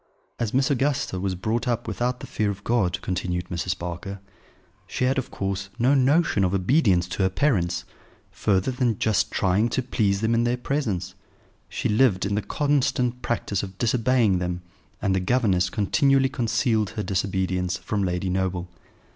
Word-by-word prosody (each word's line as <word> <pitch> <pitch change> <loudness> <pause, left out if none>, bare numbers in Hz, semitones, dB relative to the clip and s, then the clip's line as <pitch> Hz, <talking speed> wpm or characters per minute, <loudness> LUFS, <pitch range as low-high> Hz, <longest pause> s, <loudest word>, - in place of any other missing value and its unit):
"As 115 -3 -1
Miss 135 +3 +2
Augusta 140 -7 0
was 95 0 -1
brought 110 +6 -2
up 120 -1 -1
without 125 +1 -2
the - - -6
fear 105 -1 -1
of 100 0 -5
God," 105 -7 +1
continued 90 -1 -2
Mrs. 90 +1 -2
Barker, 90 +3 -6 0.7
"she - - -1
had, 130 +1 +2
of 130 - -5
course, 95 0 -3
no 125 +3 +3
notion 140 - +3
of 95 +1 +1
obedience 95 - +3
to 95 - -3
her 95 - +3
parents, 95 -6 0 0.5
further 95 +4 +1
than 125 -4 0
just 110 -2 +1
trying 100 +5 +2
to 130 - -1
please 100 -5 0
them 115 +1 +1
in 115 0 +2
their 120 +1 +1
presence; 125 - -2 0.6
she - - -2
lived 105 -3 +3
in 100 - -1
the 105 - +1
constant 125 0 0
practice 105 -5 -1
of 95 -1 -8
disobeying 115 -4 +2
them, 90 0 -3 0.4
and 100 -2 +2
the 95 - +2
governess 95 -3 +2
continually 135 - +2
concealed 115 -4 0
her 105 - -1
disobedience 95 -1 -1
from 100 +2 -2
Lady 90 0 -1
Noble. 90 -1 -1
105 Hz, 170 wpm, -24 LUFS, 95-125 Hz, 0.7 s, no